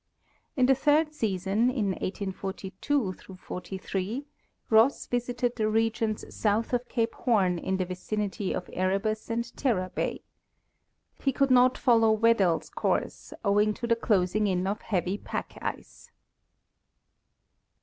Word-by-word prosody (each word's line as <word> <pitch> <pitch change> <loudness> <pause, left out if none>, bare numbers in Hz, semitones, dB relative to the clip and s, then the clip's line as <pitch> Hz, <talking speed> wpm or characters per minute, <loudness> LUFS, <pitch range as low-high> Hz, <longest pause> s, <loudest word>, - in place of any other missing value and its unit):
In 255 - +5
the 270 - +6
third 300 +3 +2
season, 210 -2 +1
in 230 -6 0
1842 190 +4 -3 0.2
'43, 190 +7 -4 0.5
Ross 225 +5 +4
visited 245 0 -1
© - - -26
the 215 -2 0
regions 225 0 0
south 220 +3 0
of 245 0 -1
cape 230 -2 0
Horn 190 -8 +1
in 190 +2 -1
the 185 - -1
vicinity 195 +2 -3
of 180 - -3
Erebus 195 +5 -1
and 235 +1 -3
Terror 190 -9 0
bay. - - -2 1.0
He 275 - +2
could 270 +1 +1
not 255 0 +5
follow 230 -4 +4
Weddell's 215 -7 +2
course, - - -2
owing 205 +1 +3
to - - -4
the 235 0 +3
closing 210 -2 +1
in 185 -1 0
of 200 +2 -2
heavy 185 0 -1
pack - - -5
ice. - - -6
215 Hz, 130 wpm, -28 LUFS, 190-240 Hz, 1.0 s, the